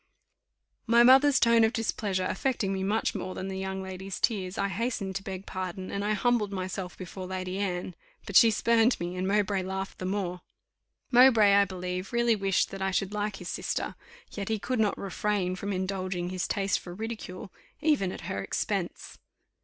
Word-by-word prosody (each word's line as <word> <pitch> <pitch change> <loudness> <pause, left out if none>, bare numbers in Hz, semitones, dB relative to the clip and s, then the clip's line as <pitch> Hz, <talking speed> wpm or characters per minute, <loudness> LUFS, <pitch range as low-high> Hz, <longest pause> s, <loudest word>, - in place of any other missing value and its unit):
My 235 +1 +6
mother's 265 +2 +7
tone 230 -1 +5
of 220 +1 +3
displeasure 205 -4 -1
affecting 225 -4 -1
me 190 - -2
much 205 +4 0
more 185 - -5
than 190 - -4
the 190 0 -4
young 190 0 -3
lady's 190 0 -6
tears, 195 -5 0
I 200 - +1
hastened 200 -1 -2
to 195 - -9
beg 190 0 -6
pardon, 185 0 -5
and 200 - -2
I 210 +1 +1
humbled 220 -1 +1
myself 185 -1 -4
before 185 0 -7
Lady 185 0 -4
Anne; 180 -2 -2 0.3
but 200 - -7
she 230 +2 +9
spurned 230 +2 +3
me, 175 +1 -4
and 185 +1 -2
Mowbray 200 -1 +1
laughed 190 +1 -5
the 185 - -4
more. 185 -2 -2 0.7
Mowbray, 240 -5 +7
I 200 0 +6
believe, 185 +1 -5
really 235 -1 +3
wished 195 -2 +1
that 195 0 -7
I 190 - +1
should 195 +1 -1
like 210 -1 -2
his 180 -3 -7
sister; - - -2 0.4
yet 200 -1 -5
he 220 - +1
could 250 +3 -2
not 210 -2 +2
refrain 195 -1 -1
from 200 +2 -4
indulging 185 -2 -2
his 185 0 -2
taste 195 -1 0
for 175 -1 -9
ridicule, 215 -3 -6 0.3
even 285 -12 +2
at - - -7
her 100 - -3
expense. - - -3
195 Hz, 185 wpm, -28 LUFS, 185-215 Hz, 0.7 s, she